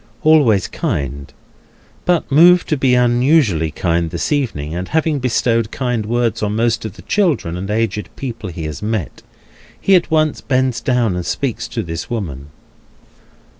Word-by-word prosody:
Always 140 - +4
kindly, 70 -1 -3 0.8
but 175 -5 +1
moved 175 +5 +6
to 155 - +2
be 130 -3 +2
unusually 120 - +3
kind 85 +1 -1
this 85 - -3
evening, 110 - -1
and 90 +2 -4
having 155 -2 0
bestowed 115 -3 +1
kind 125 -5 -2
words 120 -1 0
on 105 0 -1
most 115 0 0
of 110 - -5
the - - -13
children 165 - 0
and 95 +2 -5
aged 105 -1 -1
people 115 -6 -6
he 85 -1 -6
has 75 -1 -5
met, 105 -6 -3 0.6
he 195 - +2
at 175 - +2
once 155 -1 +1
bends 130 -3 0
down, 120 -5 +1
and 90 - -3
speaks - - -3
to - - -4
this 80 0 -6
woman. 80 - -5
115 Hz, 160 wpm, -18 LUFS, 90-135 Hz, 0.8 s, moved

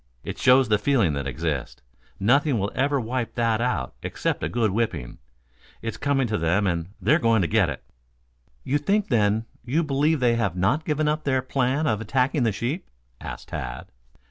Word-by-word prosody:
It - - -6
shows 130 0 +5
the 105 -1 +2
feeling 115 - +2
that 70 -1 -3
exists. 70 0 -3 0.4
Nothing 135 +6 +3
will 100 0 -1
ever 140 +1 +1
wipe 120 0 -3
that 115 -1 +1
out 120 - -1
except - - -2
a - - -1
good 115 -3 +1
whipping. 100 - -2 0.6
It's 115 - -3
coming 140 -2 +1
to 110 -4 -1
them 85 +5 +1
and 85 -2 -1
they - - +3
are 160 - +4
going 115 - +3
to - - +1
get 105 -4 +2
it." 70 - -6 0.8
"You 145 +2 0
think 200 +7 0
then 110 -2 +2 0.2
you 140 +8 0
believe 150 +1 +1
they 120 -2 +3
have 100 -7 0
not 110 - +1
given 150 0 0
up 155 +1 0
their 130 -3 +1
plan 130 +3 0
of 110 -7 0
attacking 130 +5 +1
the 115 -2 +2
sheep?" 120 - -3 0.3
asked - - -8
Tad. 60 +2 -6
120 Hz, 190 wpm, -24 LUFS, 100-140 Hz, 0.8 s, shows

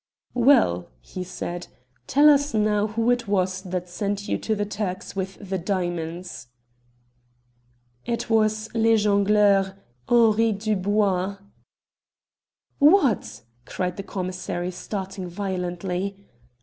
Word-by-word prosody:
"Well," 235 - +3
he 180 - -7
said, 175 -1 -6 0.4
"tell 290 +3 +5
us 285 -2 +4
now 210 -1 +2
who 225 +3 +1
it 240 -2 0
was 185 -2 0
that 180 -1 -4
sent 200 +3 -3
you - - -1
to 220 - -1
the 205 0 -1
Turks 200 -3 -4
with 190 0 -3
the 190 0 -2
diamonds?" 175 - -3 1.6
"It 235 -1 -2
was 215 -1 +2
Le 225 0 +4
Jongleur, 200 -1 +3 0.3
Henri 225 -1 +4
Dubois." 200 -2 0 1.4
"What?" 265 - +3 0.2
cried 180 -1 -3
the - - -3
commissary, 185 -2 -4
starting 190 0 -5
violently. 185 +1 -4
200 Hz, 110 wpm, -24 LUFS, 185-215 Hz, 1.6 s, tell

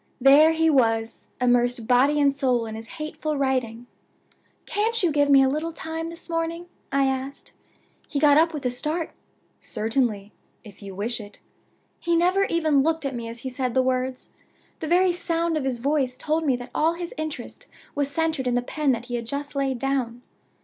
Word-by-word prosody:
There 280 +5 +7
he 325 0 +2
was, 225 -6 +1
immersed 245 -1 +2
body 265 +5 +3
and 280 -1 +4
soul 255 -4 +1
in 220 - -6
his 225 +1 -8
hateful 305 -1 -3
writing! 250 -4 -1 0.8
'Can't 445 +1 0
you 345 - +3
give 290 -1 +2
me 275 -1 +7
a - - +4
little 305 +5 -1
time 325 0 -5
this 335 +1 -8
morning?' 335 +1 -2 0.3
I 275 0 +3
asked. 265 +1 -3 0.6
He 290 - -3
got 290 0 +5
up 325 +2 +4
with 295 -4 -6
a 250 - +1
start. 310 +6 -2 0.5
'Certainly, 220 -3 -1 0.3
if 210 -2 -14
you 195 -2 -8
wish 225 +4 -2
it.' 205 -1 -12 0.6
He 340 -1 0
never 365 +4 +3
even 315 -6 +2
looked 320 +1 0
at 275 - -2
me 235 -2 -5
as 230 0 -8
he 260 - -4
said 250 -1 -3
the 260 - +4
words. 255 0 -2 0.5
The 315 - -4
very 360 +2 +4
sound 335 -1 -1
of 300 -3 -1
his 260 -2 -1
voice 265 0 0
told 310 +2 -1
me 265 - +3
that 245 0 -8
all 320 +2 +2
his 345 0 -6
interest 310 -1 -6 0.3
was 285 -1 0
centered 315 -3 -1
in 245 - +1
the 245 - +1
pen 290 +1 0
that 235 0 -4
he 245 - -8
had 235 -1 -3
just 285 +3 -4
laid 270 -2 0
down. 250 -2 -2
275 Hz, 195 wpm, -24 LUFS, 245-320 Hz, 0.8 s, There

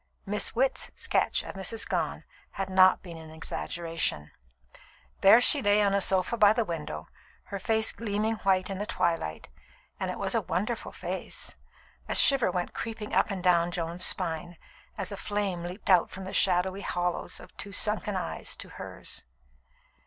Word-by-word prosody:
Miss 205 +3 -1
Witt's 265 +3 +1
sketch - - 0
of - - -7
Mrs. 195 +3 -3
Gone - - -2 0.3
had 195 -1 -4
not 185 0 +5
been 170 -3 -9
an 160 -1 -11
exaggeration. 165 - -3 0.9
There 200 +4 +8
she 275 +3 +7
lay 205 -2 +4
on 200 -1 +2
a 200 - +2
sofa 190 +5 +2
by 210 -1 +6
the 225 0 0
window, 150 - -5 0.4
her 200 - -6
face 220 +2 +1
gleaming 220 0 -1
white 190 -1 +1
in 195 - -4
the 205 - -3
twilight; 165 - -1 0.5
and - - -2
it - - -4
was - - -1
a - - +2
wonderful - - -2
face. - - -6 0.5
A - - -1
shiver 270 -7 +5
went 180 -1 -2
creeping 220 -2 -5
up - - +3
and 190 -3 -4
down 175 -2 +4
Joan's 175 0 -3
spine, 175 -1 +1 0.4
as 195 -2 -2
a 200 - -5
flame 200 -4 -2
leaped 180 +4 -3
out 180 -2 +5
from 190 - -8
the 190 - -7
shadowy 185 +1 +2
hollows 175 -2 -2
of - - -14
two 200 - -7
sunken 210 0 0
eyes 185 - -4
to - - -10
hers. - - -5
190 Hz, 170 wpm, -28 LUFS, 175-210 Hz, 0.9 s, There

